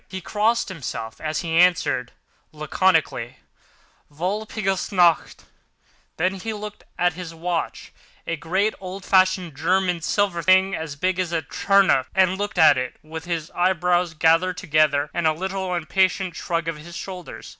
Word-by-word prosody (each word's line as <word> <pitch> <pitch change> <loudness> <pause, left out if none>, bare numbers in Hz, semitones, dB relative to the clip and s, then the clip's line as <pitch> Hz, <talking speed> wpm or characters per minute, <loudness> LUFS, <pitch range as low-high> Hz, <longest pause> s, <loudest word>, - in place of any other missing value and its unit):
He 190 - -6
crossed 220 +5 0
himself, 120 -10 -6
as 155 0 -2
he 170 -3 -5
answered 175 -8 +3 0.4
laconically: 155 -5 0 0.7
"Walpurgis 195 +5 -2
nacht." 175 -4 +2 0.7
Then 185 +4 +1
he 225 +4 -4
took 210 0 -8 0.2
out 180 -1 +2
his 165 -1 -8
watch, 170 +1 -3 0.3
a 165 - -2
great, 185 +7 0
old 190 0 -8
fashioned 185 -4 +2
German 180 +3 +1
silver 190 0 0
thing 190 +3 +4
as 160 -4 -4
big 185 +5 -1
as 180 -2 -1
a 165 -2 -1
turnip, 195 -9 +2
and 190 -1 +3
looked 205 0 -3
at 150 -4 +6
it, 125 - -4
with 160 +1 -8
his 165 -3 -3
eyebrows 180 -1 +1
gathered 165 +4 +3
together 150 -2 +1
and 170 -2 +1
a 155 - +3
little 190 +2 -3
impatient 185 +1 0
shrug 170 -1 -2
of 165 -2 -3
his 170 +3 -9
shoulders. 185 -3 -8
175 Hz, 150 wpm, -23 LUFS, 160-190 Hz, 0.7 s, at